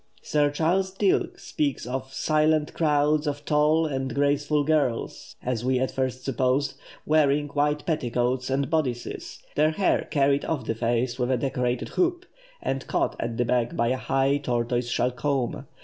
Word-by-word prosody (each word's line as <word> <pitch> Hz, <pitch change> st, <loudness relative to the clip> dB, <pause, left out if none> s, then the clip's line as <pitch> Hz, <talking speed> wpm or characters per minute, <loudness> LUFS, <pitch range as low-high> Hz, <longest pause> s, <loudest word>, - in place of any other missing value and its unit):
Sir 145 Hz, -1 st, +2 dB
Charles 175 Hz, +6 st, +1 dB
Dilke 200 Hz, -2 st, +1 dB
speaks 140 Hz, -6 st, -2 dB
of 130 Hz, +1 st, -4 dB
"silent 155 Hz, +1 st, +1 dB
crowds 150 Hz, -1 st, +2 dB
of 145 Hz, 0 st, -3 dB
tall 150 Hz, +2 st, +3 dB
and 135 Hz, -3 st, -2 dB
graceful 145 Hz, +1 st, +2 dB
girls, 145 Hz, -6 st, -1 dB
as 120 Hz, -2 st, -2 dB
we 130 Hz, +1 st, +2 dB
at 130 Hz, -, 0 dB
first 130 Hz, -1 st, -2 dB
supposed, 135 Hz, +1 st, +1 dB, 0.3 s
wearing 145 Hz, -1 st, +3 dB
white 150 Hz, +1 st, 0 dB
petticoats 125 Hz, -4 st, 0 dB
and 135 Hz, +1 st, 0 dB
bodices, 135 Hz, -7 st, -3 dB
their 155 Hz, +1 st, +3 dB
hair 185 Hz, +5 st, +1 dB
carried 140 Hz, -1 st, +2 dB
off 145 Hz, -8 st, -2 dB
the 115 Hz, -, 0 dB
face 120 Hz, +2 st, -1 dB
with 125 Hz, 0 st, 0 dB
a 130 Hz, -, +2 dB
decorated 125 Hz, -2 st, -1 dB
hoop, 360 Hz, 0 st, 0 dB, 0.4 s
and 135 Hz, 0 st, -2 dB
caught -, -, 0 dB
at 115 Hz, -1 st, -3 dB
the 120 Hz, -, +1 dB
back 120 Hz, 0 st, 0 dB
by 115 Hz, 0 st, +1 dB
a 130 Hz, -, +1 dB
high 135 Hz, +2 st, +1 dB
tortoise 120 Hz, -2 st, -1 dB
shell 125 Hz, +1 st, +1 dB
comb. 130 Hz, -1 st, -2 dB
140 Hz, 165 wpm, -26 LUFS, 125-150 Hz, 0.4 s, tall